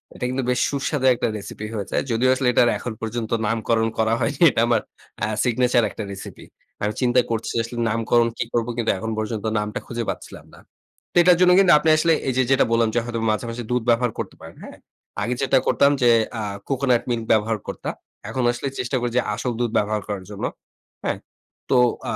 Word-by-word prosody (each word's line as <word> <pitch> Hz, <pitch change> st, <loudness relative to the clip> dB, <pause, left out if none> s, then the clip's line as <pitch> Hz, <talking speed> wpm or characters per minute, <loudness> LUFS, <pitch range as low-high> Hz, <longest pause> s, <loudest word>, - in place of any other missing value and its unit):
এটা 125 Hz, -, -4 dB
কিন্তু 130 Hz, 0 st, -2 dB
বেশ 125 Hz, -, +1 dB
সুস্বাদু 140 Hz, -1 st, -2 dB
একটা -, -, -1 dB
রেসিপি 105 Hz, +1 st, -7 dB
হয়ে 100 Hz, -3 st, -3 dB
যায়। -, -, 0 dB
যদিও 125 Hz, +3 st, +2 dB
আসলে 130 Hz, -1 st, -1 dB
এটার 120 Hz, -, +4 dB
এখন 120 Hz, -, -5 dB
পর্যন্ত 115 Hz, 0 st, -4 dB, 0.2 s
নামকরণ 115 Hz, 0 st, +1 dB
করা 110 Hz, 0 st, +2 dB
হয়নি। 130 Hz, +4 st, -1 dB
এটা 115 Hz, -, +1 dB
আমার 115 Hz, -3 st, +2 dB, 0.4 s
আ -, -, +4 dB, 0.2 s
সিগনেচার 125 Hz, 0 st, +2 dB
একটা 110 Hz, -, -6 dB
রেসিপি। 100 Hz, -, -9 dB, 0.4 s
আমি 105 Hz, +1 st, 0 dB
চিন্তা 125 Hz, 0 st, +4 dB
করছি 115 Hz, 0 st, -2 dB
আসলে 120 Hz, +1 st, -8 dB
নামকরণ 115 Hz, +1 st, +2 dB
কী -, -, -1 dB
করব? 120 Hz, 0 st, 0 dB
কিন্তু 115 Hz, -, +1 dB
এখন 110 Hz, +3 st, -4 dB
পর্যন্ত 110 Hz, 0 st, -3 dB
নামটা 105 Hz, 0 st, -3 dB
খুঁজে 120 Hz, -1 st, -3 dB
পাচ্ছিলাম -, -, -7 dB
না। -, -, -15 dB, 0.5 s
তো -, -, -43 dB
এটার 180 Hz, -1 st, +6 dB
জন্য 180 Hz, 0 st, +6 dB
কিন্তু 185 Hz, -3 st, +5 dB
আপনি 160 Hz, -, +1 dB
আসলে 165 Hz, +1 st, +3 dB, 0.2 s
এই -, -, 0 dB
যে, 130 Hz, -, +4 dB
যেটা 135 Hz, -, +4 dB
বললাম 115 Hz, -1 st, +3 dB
যে -, -, +4 dB
হয়তো 120 Hz, -1 st, -3 dB
মাঝে, 110 Hz, +3 st, -2 dB
মাঝে, 120 Hz, +1 st, -5 dB
দুধ 125 Hz, -2 st, +1 dB
ব্যবহার 120 Hz, 0 st, +3 dB
করতে -, -, -5 dB
পারেন, -, -, -11 dB
হ্যাঁ? -, -, -10 dB, 0.5 s
আগে 125 Hz, -, -1 dB
যেটা 135 Hz, 0 st, +3 dB
করতাম 140 Hz, 0 st, +4 dB
যে 120 Hz, -, +5 dB, 0.3 s
আ -, -, -2 dB, 0.3 s
কোকোনাট 130 Hz, -3 st, +2 dB
মিল্ক 115 Hz, -2 st, -1 dB
ব্যবহার 110 Hz, 0 st, +2 dB
করতাম। -, -, -5 dB, 0.4 s
এখন 130 Hz, -, -2 dB
আসলে 120 Hz, +3 st, -4 dB
চেষ্টা 125 Hz, +1 st, -1 dB
করি 120 Hz, -1 st, -1 dB
যে -, -, +5 dB
আসল 120 Hz, +2 st, -2 dB
দুধ 120 Hz, -2 st, 0 dB
ব্যবহার 105 Hz, 0 st, 0 dB
করার 100 Hz, -3 st, -5 dB
জন্য, 100 Hz, -, -4 dB, 0.6 s
হ্যাঁ? -, -, -1 dB, 0.5 s
তো 130 Hz, -, +4 dB, 0.4 s
আ -, -, -2 dB
120 Hz, 210 wpm, -22 LUFS, 110-125 Hz, 0.6 s, এটার